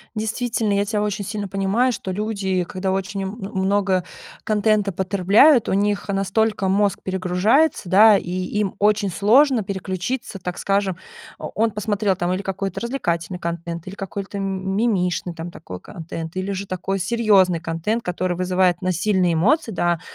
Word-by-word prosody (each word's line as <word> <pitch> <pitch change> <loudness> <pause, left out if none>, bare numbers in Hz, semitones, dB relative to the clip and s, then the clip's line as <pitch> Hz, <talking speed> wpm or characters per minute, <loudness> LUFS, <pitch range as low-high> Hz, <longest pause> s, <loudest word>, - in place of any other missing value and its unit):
Действительно, 220 0 -1
я 200 0 +1
тя 210 0 -1
очень 205 -1 -2
сильно 205 0 -4
понимаю, 195 +7 +1
что 195 -4 -5
люди, 195 -2 -1
когда 185 +2 -3
очень 195 +1 -2
м 190 - -3 0.3
много 190 -1 +1 0.4
контента 210 -1 +1
потребляют, 200 - +4
у - - +1
них 205 +1 0
настолько 200 +1 0
мозг 200 0 +2
перегружается, 190 - +1
да, 210 +3 +7
и 175 - -6
им 185 +2 -2
очень 205 0 +2
сложно 230 - +4
переключиться, 190 +4 -4
так 180 -1 -5
скажем. 195 -2 0 0.4
О - - -6
он 225 +1 +2
посмотрел, 205 -1 0
там, 175 0 -1
или 190 +2 -3
какой-то 195 0 -3
развлекательный 180 -8 -2
контент, 170 0 -5
или 190 - -7
какой-то 195 +1 -6
мимишный, 190 -2 -1
там, 165 +1 -7
такой 90 - -9
контент, 165 0 -8
или 185 +1 -2
же 195 0 -4
такой 190 +1 -3
серьезный 195 -4 +3
контент, 165 +8 -2
который 180 0 -2
вызывает 180 -1 +2
у - - -5
нас 185 -1 +1
сильные 185 -2 +2
эмоции. 235 - +2
Да, 175 -3 0
195 Hz, 160 wpm, -22 LUFS, 185-210 Hz, 0.4 s, да